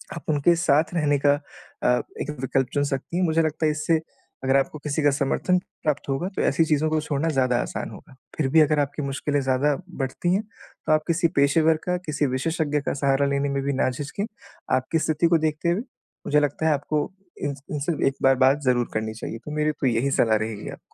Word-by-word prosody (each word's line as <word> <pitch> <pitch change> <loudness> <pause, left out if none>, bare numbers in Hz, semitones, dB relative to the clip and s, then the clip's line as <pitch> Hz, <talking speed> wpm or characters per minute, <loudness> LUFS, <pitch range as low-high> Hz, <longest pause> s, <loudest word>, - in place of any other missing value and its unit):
आप - - -7
उनके 155 +3 +4
साथ 165 0 +2
रहने 145 -4 +2
का 145 - +6 0.5
अ, 125 0 +3 0.2
एक 150 - -3
विकल्प 130 -1 +1
चुन 145 -1 +2
सकती 140 +4 -3
हैं, 185 - +2
मुझे 165 0 +2
लगता 155 0 -1
है 155 - +3
इससे 155 +1 +1 0.4
अगर 135 +1 +3
आपको 135 +3 -1
किसी 150 +1 -2
का 145 - +5
समर्थन 145 +6 +1 0.3
प्राप्त 150 -2 -1
होगा, 135 +7 -1
तो 195 - -4
ऐसी 155 +4 +3
चीज़ों 155 0 +1
को 155 0 +1
छोड़ना 150 +1 -1
ज़्यादा 125 -2 +3
आसान - - -4
होगा। - - -13 0.2
फिर 145 -4 +1
भी 160 +2 +6
अगर 150 0 +3
आपकी 145 +1 -1
मुश्किलें 140 +1 -1
ज़्यादा 135 +2 +2 0.3
बढ़ती 135 +7 -1
हैं, 195 - +2
तो 215 -6 -8
आप 155 - +2
किसी 170 0 +2
पेशेवर 155 +3 +4
का, 180 0 0
किसी 155 -4 -2
विशेषज्ञ 150 0 0
का - - -2
सहारा 140 0 +2
लेने 140 0 0
में 140 0 -1
भी 140 0 0
ना 130 - +1
झिझकें। 145 +10 -4 0.5
आपकी 130 +5 -1
स्थिति 155 +2 +1
को 165 0 +4
देखते 155 +3 -1
हुए 180 +6 +1 0.5
मुझे 150 - +4
लगता 150 +2 0
है 155 - +4
आपको 145 +3 -1 0.3
इनस 140 -1 -3
इनसे 150 0 0
एक 135 - +1
बार 135 0 +6
बात 140 +3 +3
ज़रूर 120 -2 +2
करनी 110 0 -2
चाहिए, 115 +1 -6
तो 135 +6 -10
मेरी 150 0 +1
तो 140 - -2
यही 125 +4 +1
सलाह 110 -4 +3
रहेगी 110 -1 -4
आपको। - - -9
145 Hz, 220 wpm, -24 LUFS, 135-155 Hz, 0.5 s, का